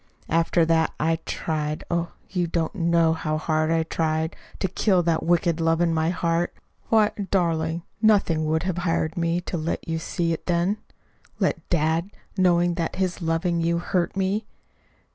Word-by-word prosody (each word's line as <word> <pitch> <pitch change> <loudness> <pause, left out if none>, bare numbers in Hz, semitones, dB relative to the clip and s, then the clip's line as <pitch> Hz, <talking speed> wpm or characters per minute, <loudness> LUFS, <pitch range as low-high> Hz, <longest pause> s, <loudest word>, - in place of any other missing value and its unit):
After 165 +1 +3
that 160 0 +2
I 165 +1 +2
tried 155 -1 -2
oh, 170 0 -1
you 180 -3 -1
don't 165 -1 -1
know 170 -3 +3
how 155 -1 -2
hard 155 0 0
I 165 0 +2
tried 160 0 -1 0.2
to - - 0
kill 185 0 +2
that 165 -1 +1
wicked 170 -1 +1
love 165 0 +2
in 170 -1 +2
my 160 0 +1
heart. 170 0 0 0.3
Why, 215 -1 +4 0.2
darling, 165 -3 0 0.2
nothing 195 -8 +3
would 160 +1 +1
have 180 -2 -1
hired 165 -2 0
me 170 +1 0
to 175 - -4
let 160 +2 -3
you 165 0 -1
see 165 +1 -1
it 160 - -6
then. 175 +4 +1 0.6
Let - - -1
dad 165 +2 +1 0.3
know 175 -3 +4
that 170 -1 -1
his 185 -1 -1
loving 165 +1 0
you 170 +1 +1
hurt 175 +2 -1
me? 195 +3 0
170 Hz, 165 wpm, -24 LUFS, 160-175 Hz, 0.6 s, Why